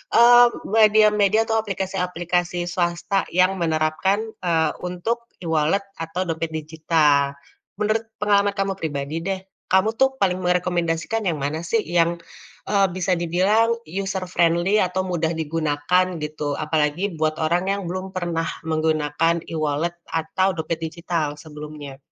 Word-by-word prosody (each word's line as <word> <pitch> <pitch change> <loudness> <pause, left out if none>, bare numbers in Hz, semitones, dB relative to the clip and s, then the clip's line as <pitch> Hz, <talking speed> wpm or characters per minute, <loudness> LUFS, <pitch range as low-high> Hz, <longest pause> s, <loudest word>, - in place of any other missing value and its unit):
eee, 240 +1 +8 0.2
media-media 215 0 +4
atau 225 0 +1
aplikasi-aplikasi 180 -3 -2
swasta 175 +2 0
yang 185 +1 +4
menerapkan, 160 +5 +1 0.2
eee, 160 -3 +2
untuk 225 +7 -3
e-wallet 160 +4 +1 0.2
atau 170 +3 -2
dompet 165 0 -2
digital. 155 -3 +1 0.4
Menurut 215 +2 0 0.2
pengalaman 205 -1 +3
kamu 195 0 0
pribadi 145 0 -3
deh, 190 0 -2 0.3
kamu 190 +3 +4
tuh 265 0 +3
paling 185 -1 +2
merekomendasikan 180 +3 0
yang 165 -4 0
mana 150 +4 -2
sih 225 +5 +1
yang, 170 0 +2 0.5
eee, 200 -2 +4
bisa 185 0 0
dibilang 195 +7 +2
user 190 +2 -3
friendly 175 +3 +2
atau 185 +1 0
mudah 170 -2 -1
digunakan 160 +2 0 0.2
gitu, 150 -1 -3
apalagi 155 +5 0
buat 155 0 +1
orang 170 +3 +1
yang 200 - -3
belum 185 +1 -5
pernah 170 -2 -1 0.2
menggunakan 155 +1 +1
e-wallet 155 +2 -1
atau 165 +4 0
dompet 160 +1 -2
digital 165 -2 -2
sebelumnya. 150 -3 -9
175 Hz, 130 wpm, -22 LUFS, 160-195 Hz, 0.5 s, eee